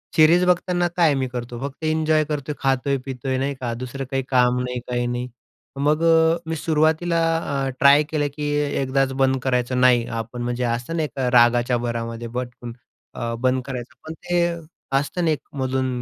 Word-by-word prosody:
Series 165 +3 +6
बघताना 180 0 +1
काय 165 -4 +4
मी 130 -1 -1
करतो 120 -1 -6
फक्त 140 +3 -7
एन्जॉय 155 0 +2
करतोय, 150 -1 -4
खातोय-पितोय 135 -1 -1
नाही 135 +2 -1
का, 120 -2 -3
दुसरं 130 +3 -5
काही 135 0 0
काम 125 -1 +3
नाही, 125 0 -3
काही 120 0 -1
नाही. 120 +1 -3 0.5
मग 150 +3 +2
अ, 165 0 +5
मी 165 - -1
सुरुवातीला 160 +2 +1 0.2
अ, 140 -4 -2
ट्राय 140 +2 +6
केलं 150 -2 0
की 150 -1 -3 0.3
एकदाच 135 0 +1
बंद 135 0 +3
करायचं 125 -1 0
नाही 125 -2 +5
आपण. 115 +2 -5
म्हणजे 120 +1 -2
असतं 120 +6 -2
नाही 160 -2 0
का 130 -2 0
रागाच्या 120 0 +4
भरामध्ये 115 0 -4
पटकन 120 0 -6 0.4
अ, 115 0 -3
बंद 130 +1 +1
करायचं. 125 -3 -6
पण 160 - -5
ते 175 +1 -1 0.5
असतं 145 +5 -2
ना 160 - +3
एक 150 - -1 0.2
मधून, 130 0 0
130 Hz, 170 wpm, -22 LUFS, 125-155 Hz, 0.5 s, Series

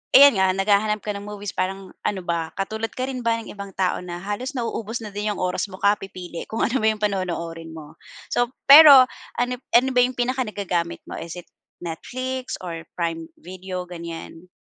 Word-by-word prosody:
ayan 280 -3 +9
nga, 190 0 +4
naghahanap 210 +2 +2
ka 210 - -2
ng 200 - -6
movies 205 -1 -6
parang 190 0 -3
ano 195 -3 -1
ba, 165 -1 -1
katulad 220 +3 -2
ka 255 - -3
rin 255 -2 -4
ba 230 0 +1
ng 225 - -9
ibang 200 -1 -8
tao 185 -1 0
na 175 -1 -6
halos 210 +8 -4
nauubos 230 -1 -3
na 210 - -7
din 210 +1 -1
yung - - -8
oras 180 +3 -1
mo 185 - -8
kapipili 195 -4 -1
kung 225 - -1
ano 255 +3 0
ba - - +4
yung 215 - -6
panonoorin 170 -5 -2
mo? 155 0 -11 0.4
So, 245 0 +1 0.2
pero 280 -3 +11 0.3
ano 245 +1 +1 0.2
ano 260 +2 +6
ba - - +5
yung 250 0 -1
pinaka 255 +1 +1
nagagamit 180 -6 -2
mo? - - -7
Is 170 +1 -7
it - - -14 0.3
Netflix 255 +10 -5
or 165 -2 -6
Prime 165 -1 -3
Video, 185 0 -7
ganyan? 170 0 -8
200 Hz, 195 wpm, -23 LUFS, 175-230 Hz, 0.4 s, pero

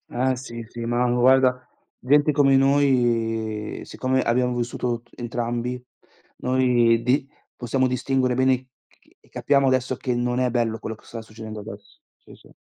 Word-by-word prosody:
Eh 130 +1 0
sì, 120 -2 -8
sì, 120 - -9
ma 120 +1 +1
guarda, 125 +1 +3 0.3
gente 145 +3 +3
come 135 -2 +4
noi, 115 -6 +1
siccome 130 0 -1
abbiamo 125 +1 +1
vissuto 120 0 -2
t 120 - -31
entrambi, 120 +1 -3 0.6
noi 120 -3 +2
di 135 +3 +1 0.3
possiamo 130 +2 0
distinguere 125 0 0
bene 130 +1 +3
e 130 +1 -7 0.2
c - - -30
e - - -26
capiamo 140 -1 +1
adesso 130 -1 +1
che 125 -2 -2
non 120 0 -1
è 125 - +1
bello 115 -2 -1
quello 110 0 -6
che - - -24
sta 115 -1 -8
succedendo 110 -1 -9
adesso. 100 -1 -12 0.2
Sì, - - -17
sì. - - -20
125 Hz, 160 wpm, -23 LUFS, 115-130 Hz, 0.6 s, come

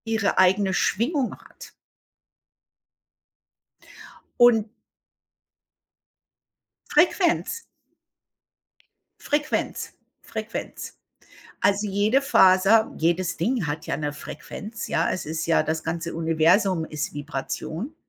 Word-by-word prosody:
ihre 220 -4 0
eigene 190 +1 +3
Schwingung 250 - 0
hat. - - -15 2.7
Und 225 -3 +5 2.2
Frequenz. 360 +5 +2 1.6
Frequenz, 295 +1 -2 0.3
Frequenz. - - -7 0.6
Also, 200 +1 +2
jede 205 +6 +2
Faser, 200 -2 +5
jedes 175 +2 0
Ding 220 - -1
hat 150 +2 -4
ja - - -1
'ne 150 -1 -3
Frequenz, 205 +9 -8
ja? 165 - +1
Es 185 - -3
ist 160 +1 -3
ja 165 - +3
das 160 0 -2
ganze 170 +1 -4
Universum 165 +3 +2
ist 155 -1 -5
Vibration. 160 - -5
190 Hz, 85 wpm, -24 LUFS, 160-225 Hz, 2.7 s, Und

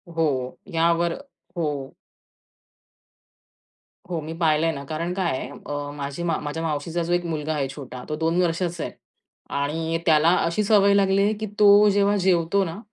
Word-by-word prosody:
हो. 135 -6 -1 0.2
यावर 170 +1 +2 0.4
हो. 145 -5 -3 2.2
हो 170 -2 -2
मी 155 +2 -6
पाहिलंय 160 -1 +2
ना. 140 -3 -6
कारण 165 +4 -3
काय 175 -8 -1
आहे - - -5
अ, 145 0 -6
माझी 140 +3 -5
माव 165 -2 0
माझ्या 150 +2 -4
मावशीचा 165 +2 -2
जो 175 - -1
एक 175 0 0
मुलगा 155 -1 -2
आहे 140 -3 -1
छोटा, 130 -3 -8
तो 155 - -1
2 165 +3 +1
वर्षाचा 170 -1 -1
आहे - - -4 0.7
आणि 160 +3 -1
त्याला 160 0 +5
अशी 170 +6 0
सवय 200 -1 +4
लागली 195 -1 +3
आहे, 210 - +2
की 215 +1 -5
तो 205 0 +7
जेव्हा 200 0 +3
जेवतो 175 +2 +3
ना 170 +2 -5
165 Hz, 165 wpm, -24 LUFS, 150-180 Hz, 2.2 s, तो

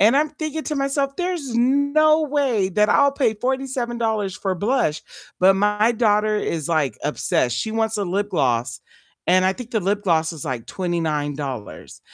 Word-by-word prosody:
and 225 +7 +5
I'm 305 +1 +2
thinking 310 +1 -4
to 300 - -3
myself, 275 0 -1
there's 350 -9 -3
no 285 +5 +3
way 275 -9 +1
that 210 +3 +2
I'll 280 +5 +4
pay 250 -6 +1
$47 235 -5 -2
for 190 -2 -2
blush, 200 - 0 0.4
but 190 +1 +5
my 210 +3 +2
daughter 215 -2 +2
is, 165 -7 -2
like, 150 -9 0
obsessed. 150 -4 0
She 220 - -2
wants 225 0 0
a 205 - -1
lip 200 +3 -2
gloss, 120 -3 0 0.5
and 185 +1 +4
I 190 - +3
think 245 +4 -10
the 220 - +1
lip 200 +2 -1
gloss 165 -4 +1
is, 155 -4 -8
like, 130 -6 -4
$29, 150 - -4
210 Hz, 170 wpm, -22 LUFS, 170-265 Hz, 0.5 s, and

